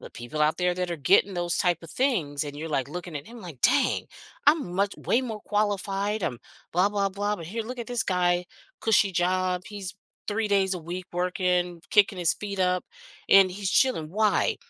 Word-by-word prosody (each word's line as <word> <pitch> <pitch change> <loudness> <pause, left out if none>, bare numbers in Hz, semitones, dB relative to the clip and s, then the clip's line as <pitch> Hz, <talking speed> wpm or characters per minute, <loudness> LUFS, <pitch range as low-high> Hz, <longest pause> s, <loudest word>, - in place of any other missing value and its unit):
the - - -11
people 120 +6 -6
out 150 +1 +3
there 180 0 +1
that 180 -1 -2
are 170 - -2
getting 185 +7 +3
those 175 0 -1
type 175 -2 +1
of 165 - -10
things 165 - 0
and 145 0 -7
you're, 160 +2 -5
like, 140 -3 -1
looking 175 -1 -6
at 140 - -8
him, 235 +1 -11
like, 165 - -10
"Dang, 280 - +2 0.4
I'm 290 - +3
much 200 +1 +1
way 245 - +1
more 225 -4 -5
qualified, 205 0 -1
I'm 120 -8 -2 0.3
blah, 180 +4 +3
blah, 200 -1 0
blah. 205 +2 -1
But 165 -4 -8
here, 225 +5 -3
look 250 +3 -7
at 235 - -5
this 245 -2 -1
guy, 180 -1 +1 0.3
cushy 210 -3 +3
job. 180 0 +1
He's 200 -2 -6 0.3
3 215 +1 0
days 195 -1 +2
a - - -4
week 175 +3 -6
working, 180 -1 0
kicking 205 -2 +4
his 170 -2 +2
feet 200 -2 -6
up, 180 0 +1 0.4
and 195 -1 +7
he's 195 +1 -3
chilling." 250 -13 +2
Why? 215 +2 +2
185 Hz, 205 wpm, -26 LUFS, 175-205 Hz, 0.4 s, and